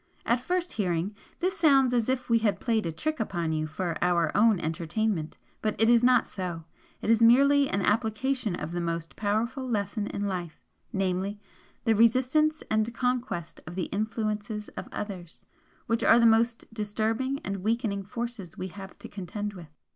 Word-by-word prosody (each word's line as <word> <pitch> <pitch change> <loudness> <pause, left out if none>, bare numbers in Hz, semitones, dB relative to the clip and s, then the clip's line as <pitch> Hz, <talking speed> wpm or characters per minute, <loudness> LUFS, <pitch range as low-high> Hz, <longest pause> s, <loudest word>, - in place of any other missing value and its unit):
At 235 +1 +2
first 360 +5 -1
hearing, 180 -1 -1 0.3
this 370 +2 +1
sounds 275 -7 +4
as 235 -1 +1
if 260 -1 -1
we 230 -1 +4
had 215 -2 +1
played 225 -7 0
a - - -2
trick 310 - -3
upon 175 -7 -1
you 155 0 -1
for 165 +2 -3
our 170 -3 +2
own 220 -3 +5
entertainment 165 +2 -2 0.2
but 215 -1 -1
it 225 +1 +5
is 240 0 +5
not 250 -2 +5
so, 175 -4 -5 0.4
it 220 - +2
is 230 0 +4
merely 275 +4 +6
an 195 0 0
application 220 +1 0
of 155 -1 -5
the 175 0 -2
most 165 -1 -3
powerful 225 +6 -1
lesson 205 -1 -1
in 205 - -3
life 180 -5 -4 0.3
namely, 195 +1 -1 0.4
THE 225 - +3
RESISTANCE 260 +8 +3
AND 220 +1 +2
CONQUEST 250 -9 -2
OF 175 - -7
THE 185 -3 -2
INFLUENCES 210 0 -2
OF - - -8
OTHERS, 185 -5 -7 0.4
which 230 -2 0
are 230 - +7
the 235 - +5
most 230 0 +2
disturbing 220 +5 -1
and 195 +1 -2
weakening 215 0 -1
forces 220 -4 -6
we 185 - -4
have 195 +1 -10
to - - -9
contend 205 +1 -5
with." 175 -5 -11
215 Hz, 175 wpm, -28 LUFS, 185-235 Hz, 0.4 s, are